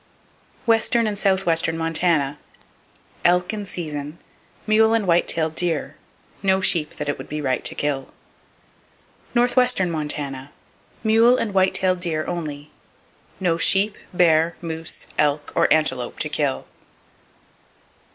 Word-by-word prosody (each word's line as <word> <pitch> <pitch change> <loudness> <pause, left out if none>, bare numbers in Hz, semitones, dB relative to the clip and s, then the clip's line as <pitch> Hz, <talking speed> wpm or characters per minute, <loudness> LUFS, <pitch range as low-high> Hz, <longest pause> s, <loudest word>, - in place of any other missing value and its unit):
Western 230 0 +2
And 210 -2 -3
Southwestern 175 -5 +1
Montana: 160 -3 0 0.8
Elk 180 +3 +2
in 205 -2 -5
season, 150 -4 -5 0.5
mule 220 +1 +4
and 220 -3 0
white 175 -1 +2
tail 160 -1 0
deer; 160 -3 -2 0.5
no 190 -1 +2
sheep 165 -5 +1
that 150 - -5
it 145 - -2
would - - -9
be 150 - -4
right 130 -3 -1
to - - +1
kill. 140 -2 -3 1.2
Northwestern 245 -6 +3
Montana: 145 -3 -3 0.5
Mule 225 +3 +5
and 210 -3 -2
white 190 -1 +2
tailed 185 -1 +2
deer, 160 -3 -1
only. 150 -3 -5 0.7
No 170 -3 0
sheep, 200 +4 +3 0.2
bear, 165 -2 +3
moose, 160 -1 -5
elk 145 0 +1
or - - +2
antelope 130 -6 +1
to - - -2
kill! 65 - -1
170 Hz, 125 wpm, -22 LUFS, 150-195 Hz, 1.2 s, Mule